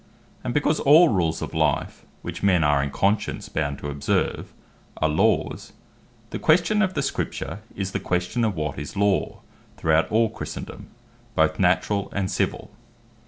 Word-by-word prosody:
And 125 Hz, -, -2 dB
because 145 Hz, +3 st, +1 dB
all 160 Hz, +5 st, +7 dB
Rules 85 Hz, -6 st, 0 dB
of -, -, -6 dB
life, -, -, -1 dB, 0.2 s
which -, -, -6 dB
men 95 Hz, -5 st, +3 dB
are 75 Hz, -1 st, +3 dB
in 70 Hz, -, -2 dB
conscience 100 Hz, +8 st, -1 dB
bound 70 Hz, -2 st, -2 dB
to 75 Hz, -, -6 dB
observe, 70 Hz, 0 st, -1 dB, 0.5 s
are 80 Hz, -, +2 dB
Laws; 75 Hz, -, 0 dB, 0.6 s
the -, -, -4 dB
question 180 Hz, +7 st, +3 dB
of 190 Hz, -2 st, 0 dB
the 140 Hz, -, 0 dB
Scripture, 105 Hz, -, -3 dB, 0.2 s
is 95 Hz, -1 st, -3 dB
the -, -, -2 dB
question 90 Hz, +7 st, -1 dB
of 110 Hz, -4 st, 0 dB
what 75 Hz, -3 st, -3 dB
is 70 Hz, +5 st, -7 dB
Law 100 Hz, -1 st, +1 dB, 0.4 s
throughout 80 Hz, 0 st, +2 dB
all 110 Hz, 0 st, +3 dB
Christendome, -, -, -7 dB, 0.5 s
both -, -, +2 dB
Naturall, 100 Hz, -2 st, +1 dB
and 100 Hz, 0 st, -1 dB
Civill. -, -, -2 dB
100 Hz, 160 wpm, -24 LUFS, 80-120 Hz, 0.6 s, all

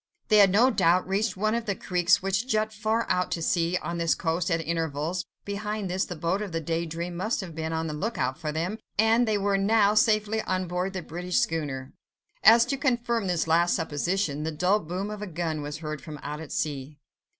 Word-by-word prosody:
They 215 Hz, -, +6 dB
had 200 Hz, -2 st, +7 dB
no 230 Hz, +7 st, +4 dB
doubt 180 Hz, -4 st, +3 dB
reached 195 Hz, 0 st, 0 dB
one 215 Hz, +2 st, +1 dB
of 235 Hz, -1 st, -2 dB
the 200 Hz, -, 0 dB
creeks 180 Hz, +2 st, +2 dB
which 195 Hz, +5 st, 0 dB
jut 215 Hz, -2 st, 0 dB
far 220 Hz, +2 st, 0 dB
out 180 Hz, 0 st, +1 dB
to 165 Hz, -, -3 dB
sea 170 Hz, +1 st, +1 dB
on 170 Hz, 0 st, -3 dB
this 165 Hz, -1 st, +2 dB
coast 170 Hz, +1 st, -1 dB
at 165 Hz, -1 st, +1 dB
intervals; 165 Hz, +1 st, -2 dB, 0.2 s
behind 205 Hz, -1 st, -3 dB
this, 185 Hz, +1 st, 0 dB
the 180 Hz, -, -6 dB
boat 170 Hz, +5 st, -1 dB
of 205 Hz, -3 st, -4 dB
the 165 Hz, -, -1 dB
Day 165 Hz, +1 st, -2 dB
Dream 170 Hz, +2 st, -5 dB
must 215 Hz, +7 st, -1 dB
have 180 Hz, -4 st, -8 dB
been 160 Hz, 0 st, -3 dB
on 160 Hz, 0 st, -1 dB
the 155 Hz, -, -3 dB
look 210 Hz, +10 st, -3 dB
out 130 Hz, +1 st, 0 dB
for 155 Hz, -2 st, -3 dB
them, 175 Hz, +8 st, -3 dB, 0.2 s
and 225 Hz, +3 st, +4 dB
they 215 Hz, -1 st, +2 dB
were 200 Hz, 0 st, +1 dB
by -, -, -1 dB
now 210 Hz, 0 st, +4 dB
safely 215 Hz, -1 st, +2 dB
on 185 Hz, -3 st, -2 dB
board 180 Hz, +2 st, -2 dB
the 185 Hz, -2 st, -4 dB
British 175 Hz, +3 st, -3 dB
schooner. 150 Hz, -, -1 dB, 0.5 s
As 230 Hz, +1 st, +8 dB
if 245 Hz, -, -7 dB
to 275 Hz, -, 0 dB
confirm 240 Hz, -5 st, 0 dB
this 175 Hz, -3 st, 0 dB
last 170 Hz, +2 st, +3 dB
supposition, 165 Hz, 0 st, -1 dB
the 160 Hz, +1 st, -2 dB
dull 180 Hz, +7 st, +2 dB
boom 185 Hz, +4 st, -4 dB
of 210 Hz, -1 st, -6 dB
a 210 Hz, -, -4 dB
gun 160 Hz, -3 st, -3 dB
was 145 Hz, +1 st, -5 dB
heard 155 Hz, -2 st, -5 dB
from 155 Hz, -2 st, -8 dB
out 150 Hz, +1 st, -5 dB
at 160 Hz, -, -9 dB
sea. 145 Hz, -1 st, -3 dB
180 Hz, 230 wpm, -27 LUFS, 160-210 Hz, 0.5 s, As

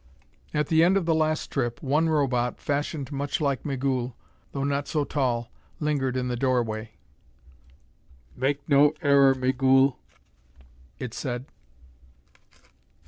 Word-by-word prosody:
At 150 Hz, -1 st, -1 dB
the 160 Hz, 0 st, +5 dB
end 185 Hz, +3 st, +4 dB
of 190 Hz, -, -1 dB
the 165 Hz, -, +2 dB
last 155 Hz, 0 st, 0 dB
trip, 120 Hz, -4 st, -2 dB
one 150 Hz, +4 st, +2 dB
Robot, 125 Hz, -5 st, 0 dB
fashioned 145 Hz, 0 st, -2 dB
much 140 Hz, +6 st, -2 dB
like 140 Hz, -4 st, 0 dB
Migul 130 Hz, -3 st, -2 dB, 0.4 s
though 140 Hz, -, -3 dB
not 140 Hz, 0 st, -1 dB
so 150 Hz, -3 st, 0 dB
tall, 125 Hz, -5 st, -1 dB, 0.3 s
lingered 140 Hz, -4 st, 0 dB
in 125 Hz, 0 st, -1 dB
the 125 Hz, -, -1 dB
doorway. 115 Hz, -4 st, -1 dB, 1.4 s
"Make 140 Hz, +2 st, -1 dB
no 145 Hz, +1 st, +5 dB
error, 140 Hz, -2 st, +5 dB
Migul," 130 Hz, +1 st, +3 dB, 1.0 s
it 125 Hz, -3 st, -6 dB
said. 125 Hz, -1 st, -4 dB
135 Hz, 125 wpm, -26 LUFS, 125-145 Hz, 1.4 s, the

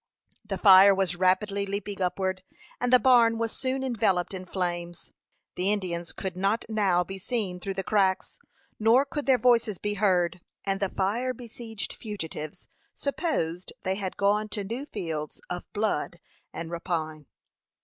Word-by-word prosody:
The 205 Hz, -2 st, -4 dB
fire 195 Hz, 0 st, +8 dB
was 190 Hz, -3 st, 0 dB
rapidly 190 Hz, +3 st, +2 dB
leaping 200 Hz, 0 st, -4 dB
upward, 185 Hz, +1 st, -1 dB, 0.4 s
and 245 Hz, 0 st, 0 dB
the 250 Hz, -, +9 dB
barn 240 Hz, -3 st, +5 dB
was 225 Hz, 0 st, -1 dB
soon 265 Hz, 0 st, -2 dB
enveloped 200 Hz, -8 st, +1 dB
in 185 Hz, -1 st, -5 dB
flames. 175 Hz, -2 st, -3 dB, 0.4 s
The 185 Hz, +3 st, 0 dB
Indians 175 Hz, -4 st, -2 dB
could 190 Hz, -2 st, -5 dB
not 195 Hz, +5 st, 0 dB
now 200 Hz, -5 st, +2 dB
be 195 Hz, +2 st, -8 dB
seen 200 Hz, -4 st, -3 dB
through 195 Hz, +1 st, -4 dB
the 195 Hz, -, -2 dB
cracks, 190 Hz, -2 st, +1 dB, 0.4 s
nor 230 Hz, +5 st, +5 dB
could 285 Hz, 0 st, -4 dB
their 265 Hz, -2 st, +6 dB
voices 230 Hz, -4 st, +3 dB
be 210 Hz, +3 st, -2 dB
heard, 180 Hz, -4 st, +1 dB, 0.2 s
and 195 Hz, -1 st, 0 dB
the 195 Hz, -, 0 dB
fire 235 Hz, +8 st, -1 dB
besieged 225 Hz, -2 st, -7 dB
fugitives 165 Hz, -6 st, -6 dB, 0.3 s
supposed 185 Hz, -, -2 dB
they 190 Hz, -, 0 dB
had 190 Hz, -1 st, -4 dB
gone 210 Hz, +2 st, +2 dB
to 205 Hz, -2 st, -4 dB
new 235 Hz, +8 st, -5 dB
fields 160 Hz, -, -4 dB
of 180 Hz, 0 st, -5 dB
blood 205 Hz, -4 st, -1 dB, 0.3 s
and 165 Hz, 0 st, -6 dB
rapine. 160 Hz, -4 st, -3 dB
195 Hz, 155 wpm, -27 LUFS, 180-220 Hz, 0.4 s, the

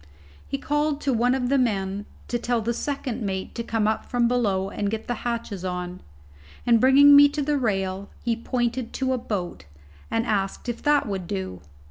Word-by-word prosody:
He 275 Hz, -, -2 dB
called 295 Hz, +1 st, 0 dB
to 275 Hz, -, +1 dB
one 245 Hz, +2 st, +2 dB
of 250 Hz, -2 st, -1 dB
the 275 Hz, 0 st, +3 dB
men 200 Hz, -4 st, -1 dB, 0.2 s
to 240 Hz, -, -1 dB
tell 240 Hz, 0 st, 0 dB
the 230 Hz, +2 st, -1 dB
second 255 Hz, -2 st, -3 dB
mate 190 Hz, -2 st, -3 dB
to 235 Hz, -, -4 dB
come 225 Hz, -2 st, 0 dB
up 220 Hz, -, 0 dB
from 240 Hz, -1 st, +1 dB
below 200 Hz, -6 st, 0 dB
and 205 Hz, -1 st, -2 dB
get 220 Hz, +1 st, -4 dB
the 245 Hz, -, -1 dB
hatches 230 Hz, -5 st, -3 dB
on, 180 Hz, 0 st, -4 dB, 0.6 s
and 235 Hz, -2 st, +4 dB
bringing 280 Hz, +2 st, +8 dB
me 285 Hz, 0 st, +9 dB
to 295 Hz, +1 st, -3 dB
the 295 Hz, 0 st, +1 dB
rail, 195 Hz, -4 st, -1 dB
he 235 Hz, -1 st, +1 dB
pointed 240 Hz, 0 st, -2 dB
to 260 Hz, -1 st, 0 dB
a 255 Hz, -, -1 dB
boat, 185 Hz, -, -4 dB, 0.4 s
and 225 Hz, +1 st, 0 dB
asked 195 Hz, 0 st, -1 dB
if 240 Hz, -1 st, -3 dB
that 290 Hz, -3 st, +3 dB
would 190 Hz, -4 st, -4 dB
do? 95 Hz, -, -4 dB
235 Hz, 195 wpm, -25 LUFS, 195-260 Hz, 0.6 s, me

